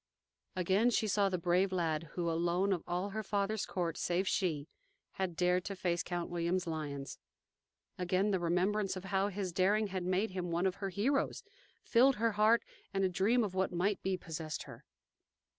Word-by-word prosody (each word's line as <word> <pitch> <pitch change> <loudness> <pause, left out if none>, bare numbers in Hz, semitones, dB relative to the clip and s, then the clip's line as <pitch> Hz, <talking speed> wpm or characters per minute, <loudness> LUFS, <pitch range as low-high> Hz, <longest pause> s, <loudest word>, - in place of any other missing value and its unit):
Again 190 +6 +3
she 220 -2 +1
saw 200 0 +2
the 185 - -1
brave 180 +3 +2
lad 165 -3 -1
who 175 -1 -2
alone 175 +4 +1
of 175 - -3
all 180 +3 -2
her 220 +2 -2
father's 205 0 -1
court, 170 -4 -2
save 180 +2 0
she, 160 -8 0 0.4
had 185 -3 -3
dared 180 +1 +2
to 200 - -4
face 175 -2 0
Count 175 -1 -3
William's 175 +2 0
lions; 145 -4 -5 0.8
again 185 +3 +1
the 190 - +1
remembrance 185 +4 +1
of 185 - -6
how 195 0 +1
his 195 -3 -3
daring 200 +4 +2
had 190 -1 -3
made 185 +4 0
him 180 -1 -3
one 170 +2 0
of 190 0 0
her 195 -1 -3
heroes, 235 +10 0 0.4
filled 260 +3 +5
her 230 +2 +1
heart, 215 +3 +4 0.3
and 195 -1 0
a 190 - +3
dream 210 +7 +2
of 200 -3 -3
what 190 0 0
might 190 +4 0
be 190 -1 0
possessed 160 -3 -5
her. - - -12
185 Hz, 185 wpm, -33 LUFS, 175-200 Hz, 0.8 s, filled